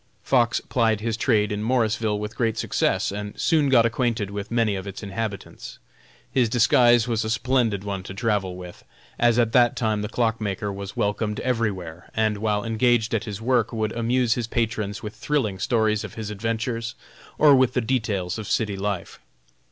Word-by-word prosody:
Fox 120 -4 +2
plied 115 -3 +1
his 115 0 -2
trade 105 -3 +1
in 105 0 -2
Morrisville 110 -2 +1
with 105 +2 -5
great 115 -2 0
success, - - 0
and 105 0 -6
soon 155 -5 +2
got 120 -3 +5
acquainted 115 -3 -1
with 100 0 -5
many 115 -3 +1
of 95 +1 -6
its 100 +2 -7
inhabitants. 100 0 -6 0.5
His 125 -4 +2
disguise 120 0 +4
was 115 -2 0
a 110 - -3
splendid 115 -3 +1
one 100 -2 -3
to 95 - -7
travel 100 -5 -1
with, 90 -1 -10 0.4
as 120 -1 +4
at 115 -2 +3
that 120 -1 +4
time 110 -3 0
the 105 - -4
clock 115 -1 0
maker 100 0 -2
was 100 0 -7
welcomed 105 +1 -1
everywhere, 95 -9 -2
and 110 -1 +1
while 105 -1 0
engaged 115 0 +2
at 110 - 0
his 105 0 -6
work 120 -3 +2
would 110 -2 -1
amuse 120 +1 +1
his 120 -2 -3
patrons 110 -3 -2
with 105 0 -5
thrilling 115 -11 -1
stories 110 -1 +1
of - - -8
his 110 -2 -5
adventures, 115 +2 -3 0.4
or 150 -2 +7
with 130 -1 +3
the - - +3
details 110 -6 -1
of 105 - -6
city 105 -3 0
life. 100 -1 -4
110 Hz, 185 wpm, -24 LUFS, 105-120 Hz, 0.5 s, or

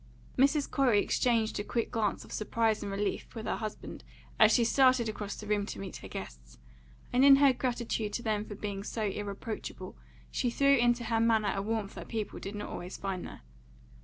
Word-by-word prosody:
Mrs. 280 +2 +3
Corey 250 -7 +3
exchanged 225 0 +1
a - - -1
quick 230 +2 -2
glance 215 -3 -1
of - - -15
surprise 220 0 0
and 200 - -4
relief 200 +4 -3
with 225 - -5
her - - -1
husband 215 -2 -6 0.4
as - - +7
she 235 - +4
started 255 -1 +4
across 210 -1 -4
the 215 - -9
room 210 -1 +1
to - - -6
meet 195 -1 -6
her - - -10
guests, - - -9 0.6
and 250 +2 +4
in 280 0 +9
her 275 -1 +5
gratitude 235 -4 -2
to 235 - -3
them 215 -2 0
for 210 - -8
being 200 -1 -4
so 220 +1 -3
irreproachable, 205 - -5 0.4
she 245 - 0
threw 275 +3 +4
into 240 -1 +2
her 225 0 0
manner 220 -3 +3
a 195 - -1
warmth 215 -1 -2
that - - -8
people 220 -3 -4
did 200 +2 -6
not 205 - -5
always 180 +2 -6
find 190 -2 -4
there. - - -11
220 Hz, 200 wpm, -30 LUFS, 205-240 Hz, 0.6 s, in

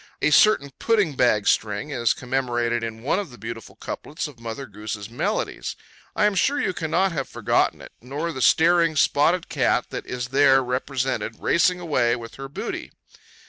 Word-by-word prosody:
A 150 - +2
certain 145 -6 +5
pudding 210 -9 +2
bag 120 -5 +3
string 110 +7 0
is 120 -4 +1
commemorated 120 -2 -1
in 115 0 -6
one 150 +8 +1
of 200 - -5
the 120 - -13
beautiful 115 +1 -8
couplets 155 +2 -5
of 140 -5 -14
Mother 115 +3 -6
Goose's 105 -1 -7
Melodies. 120 - -2 0.4
I 210 - +3
am 210 - +3
sure 280 +10 +1
you 190 -9 0
cannot 175 +3 0
have 140 -5 -3
forgotten - - 0
it, - - -12
nor 145 +7 -4
the 130 -4 -6
staring 165 +3 +4
spotted 155 +4 +2
cat - - 0
that - - -6
is 125 0 -4
there 135 0 +5
represented 125 -3 -2
racing 180 +1 +2
away 125 -9 +1
with 115 -2 -9
her 135 0 -7
booty. - - -5
135 Hz, 175 wpm, -24 LUFS, 120-165 Hz, 0.4 s, certain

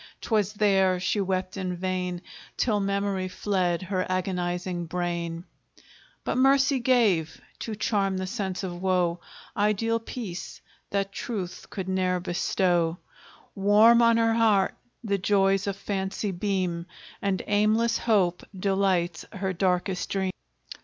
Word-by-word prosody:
'Twas 210 -3 0
there 195 -3 +3
she 185 +3 0
wept 185 -1 -2
in 185 -2 -3
vain, 180 0 -3 0.3
Till 215 -4 +2
Memory 200 -1 -1
fled 185 -2 -1
her 185 0 -1
agonizing 180 -1 -2
brain: 170 -1 -3 0.8
But - - -1
Mercy 270 +1 +4
gave, 225 -11 +2 0.2
to 220 - -4
charm 200 -3 0
the 185 - -2
sense 190 -2 -3
of 175 -2 -5
woe, 180 -2 +1 0.4
Ideal 215 +2 +1
peace, 220 -6 -7 0.3
that 195 0 -1
truth 195 -4 -5
could 190 -2 -5
ne'er 185 -1 +1
bestow; 175 -1 +1 0.6
Warm 210 +4 +6
on 230 -1 +5
her 225 0 +3
heart 220 -4 +3 0.3
the 200 -3 0
joys 195 0 +2
of 200 - -1
Fancy 200 +1 -3
beam, 180 -2 -2 0.3
And 195 -3 -1
aimless 215 +3 +2
Hope 190 -6 +2 0.2
delights 190 -3 +1
her 190 -2 -2
darkest 180 0 0
dream. 190 -1 -1
190 Hz, 125 wpm, -26 LUFS, 180-205 Hz, 0.8 s, Warm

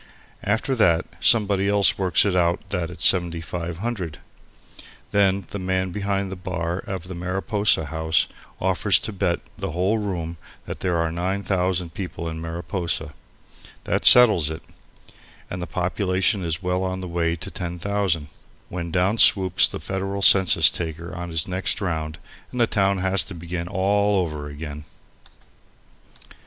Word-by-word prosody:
After 110 +6 0
that 85 -6 +3
somebody 100 -4 +3
else 100 -1 +4
works 95 -1 +2
it 100 -2 +1
out 85 0 +1
that 85 -2 -2
it's 90 - +3
7,500; 85 +1 -2 0.9
then 100 -1 +2
the 100 - -3
man 95 0 -1
behind 100 0 -2
the - - -4
bar 90 -2 -3
of 95 -3 -5
the 95 - -7
Mariposa 90 +1 0
House 80 +2 +1 0.3
offers 95 +1 +2
to 110 - -5
bet 95 -3 -1 0.2
the - - -4
whole 95 +6 +1
room 85 -5 -4 0.3
that - - -7
there 90 -2 0
are 85 -1 0
9,000 90 -1 -1
people 85 -3 -6
in 80 0 -5
Mariposa. 85 -1 -3 0.7
That - - -1
settles 105 -11 +7
it, 80 +1 -7 0.9
and 90 - -4
the 85 - -4
population 95 +3 0
is 80 +1 -3
well 90 0 0
on 95 0 -3
the 90 - -5
way 85 -1 -1
to 85 - -8
10,000, 90 -2 -2 0.4
when 85 -1 -5
down 95 +6 +1
swoops 95 -3 +6
the - - -6
federal 95 +1 -3
census 95 -3 +6
taker 85 +1 -6
on 85 0 -6
his 80 -2 0
next 90 +1 -1
round 80 -5 -3 0.3
and 125 - -5
the 120 - +5
town 100 -3 +1
has 95 0 +2
to 90 +4 -6
begin 85 +1 -5
all 100 +2 +1
over 75 -5 -3
again. 75 0 -8
90 Hz, 150 wpm, -23 LUFS, 85-95 Hz, 0.9 s, settles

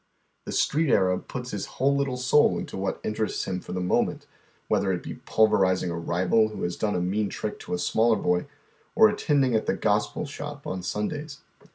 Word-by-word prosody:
The - - -3
Street 155 -1 +1
Arab 90 -2 +2
puts 125 -2 -6
liis 100 - -3
whole 140 +2 +1
little 140 -2 -1
soul 125 +4 +3
into - - -6
what 95 0 -2
interests 110 0 -2
him 95 -1 -2
for - - -10
the 90 - -2
moment, 90 0 0 0.4
wliether 100 -1 +1
it 90 - -7
be - - -6
pulverizing 95 -5 +3
a - - -3
rival 90 +6 +2
wlio 110 - -6
has 85 0 -1
done 105 -1 -1
a - - +1
mean 100 +4 0
trick 105 - -5
to - - -4
a - - -2
smaller 110 +6 +2
boy, 90 +3 0 0.5
or 220 -1 +7
attending 145 - +1
at 110 - +1
the - - +1
"gospel 105 +7 0
shop" 145 0 -7
on 95 0 -3
Sundays. 140 - -4
105 Hz, 200 wpm, -26 LUFS, 95-135 Hz, 0.5 s, or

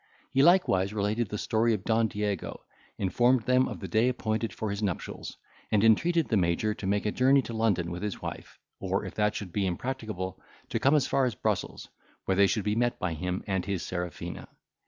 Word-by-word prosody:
He 135 - +3
likewise 110 - +4
related 105 +2 0
the 105 - -3
story 115 +2 +1
of 95 - -7
Don 110 0 +2
Diego, 105 -3 -3 0.3
informed 120 +5 +2
them 130 +1 +3
of - - -6
the - - -6
day 115 +3 +3
appointed 110 -2 -2
for 110 -2 -4
his 100 +1 -4
nuptials, 95 -5 -4 0.3
and 105 -1 +3
entreated 165 +9 +4
the 110 - +2
Major 90 +4 +1
to 105 - -6
make 100 +2 0
a 105 - +1
journey 135 +3 +4
to 115 - -6
London 100 -7 +1
with 90 +1 -5
his 105 -3 -3
wife; - - -7 0.2
or, - - -1
if - - -6
that 105 0 +1
should 90 -4 -6
be 100 -2 +1
impracticable, 110 -2 -4 0.3
to - - -1
come 140 +3 +4
as 145 -4 +3
far 135 - +2
as 120 -5 -1
Brussels, - - -2 0.4
where 95 - +1
they 100 +1 +5
should 100 +2 0
be 105 0 0
met 120 +1 +1
by 90 -2 -2
him 90 +3 -3
and 95 -2 -1
his 100 -4 -2
Serafina. 90 -3 -5
105 Hz, 210 wpm, -28 LUFS, 95-120 Hz, 0.4 s, they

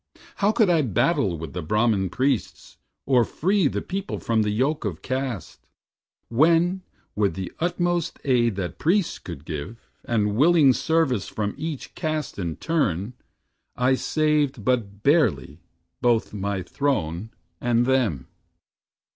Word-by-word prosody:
How 205 +1 +3
could 220 -1 +3
I 170 -3 +3
battle 100 - +1
with 80 -2 -7
the 90 - -3
Brahman 105 +2 +1
priests, 130 +3 -2 0.3
Or 125 -3 +4
free 190 - +1
the - - -3
people 195 +2 -4
from 115 -1 +1
the 105 - 0
yoke 130 +9 0
of 95 -7 -4
caste, 130 -6 -4 0.6
When, 170 +8 +3 0.3
with 100 -5 +1
the 95 -2 -5
utmost 175 0 0
aid 120 -6 +2
that 90 -2 -4
priests 180 +3 +1
could 70 - -9
give, 85 +10 -7
And 105 -3 0
willing 150 0 +5
service 160 - +1
from 105 -1 -3
each 155 -4 -5
caste 155 - -3
in 85 -4 -3
turn, 120 - -1 0.6
I 125 +1 +2
saved 150 -4 0
but 105 -5 -1
barely 85 - +2 0.4
both 120 -3 +2
my 100 -2 -2
throne 100 - -2 0.3
and 120 0 +2
them. 125 - +1
125 Hz, 135 wpm, -24 LUFS, 100-155 Hz, 0.6 s, willing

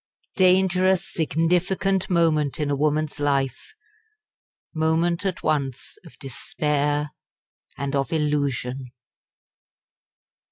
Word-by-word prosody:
Dangerous 185 0 +3
significant 180 +4 0
moment 160 -5 +1
in 150 -1 -1
a - - +2
woman's 150 +1 0
life 140 - -1 1.0
moment 165 +3 +1
at 185 - -4
once 140 -3 -2
of 165 - -16
despair 145 +2 -1 0.7
and 140 0 -3
of 135 -2 -1
illusion! 140 -5 -1
155 Hz, 85 wpm, -24 LUFS, 140-175 Hz, 1.0 s, Dangerous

